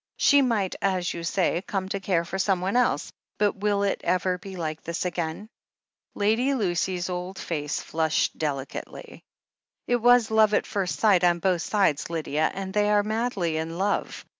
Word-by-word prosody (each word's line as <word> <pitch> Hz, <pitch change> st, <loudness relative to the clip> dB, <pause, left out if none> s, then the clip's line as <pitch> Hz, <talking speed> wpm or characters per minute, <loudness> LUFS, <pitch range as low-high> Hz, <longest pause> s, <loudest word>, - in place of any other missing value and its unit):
She 285 Hz, 0 st, +5 dB
might, 220 Hz, -8 st, 0 dB
as 185 Hz, -3 st, 0 dB
you 170 Hz, -, -6 dB
say, 175 Hz, 0 st, 0 dB
come 195 Hz, -1 st, -3 dB
to 195 Hz, -, -2 dB
care 180 Hz, -3 st, 0 dB
for 190 Hz, +3 st, -5 dB
someone 190 Hz, +1 st, 0 dB
else 250 Hz, -, +1 dB
— -, -, -51 dB
^but 205 Hz, -1 st, +2 dB
will 200 Hz, 0 st, +1 dB
it 200 Hz, -, 0 dB
ever 180 Hz, +1 st, 0 dB
be 190 Hz, +1 st, -9 dB
like 160 Hz, -3 st, -4 dB
this 170 Hz, +2 st, -4 dB
again 175 Hz, +2 st, -3 dB, 0.3 s
?" -, -, -67 dB, 0.3 s
Lady 225 Hz, +7 st, +2 dB
Lucy's 180 Hz, -4 st, -1 dB
old 180 Hz, +1 st, -5 dB
face 150 Hz, -3 st, -3 dB
flushed 160 Hz, -1 st, 0 dB
delicately. 140 Hz, -3 st, -5 dB, 0.6 s
"It 245 Hz, -, +2 dB
was 240 Hz, -1 st, +4 dB
love 215 Hz, -1 st, +4 dB
at -, -, +1 dB
first 195 Hz, -3 st, -2 dB
sight 200 Hz, -5 st, +4 dB
on 175 Hz, -1 st, +4 dB
both 175 Hz, 0 st, +1 dB
sides, 185 Hz, -8 st, +1 dB
Lydia 155 Hz, -2 st, 0 dB
— -, -, -14 dB
and 190 Hz, 0 st, -5 dB
they 210 Hz, 0 st, +2 dB
are 205 Hz, -1 st, +3 dB
madly 210 Hz, -7 st, -1 dB
in 165 Hz, +1 st, -4 dB
love. 200 Hz, +2 st, -2 dB
190 Hz, 185 wpm, -26 LUFS, 170-210 Hz, 0.6 s, She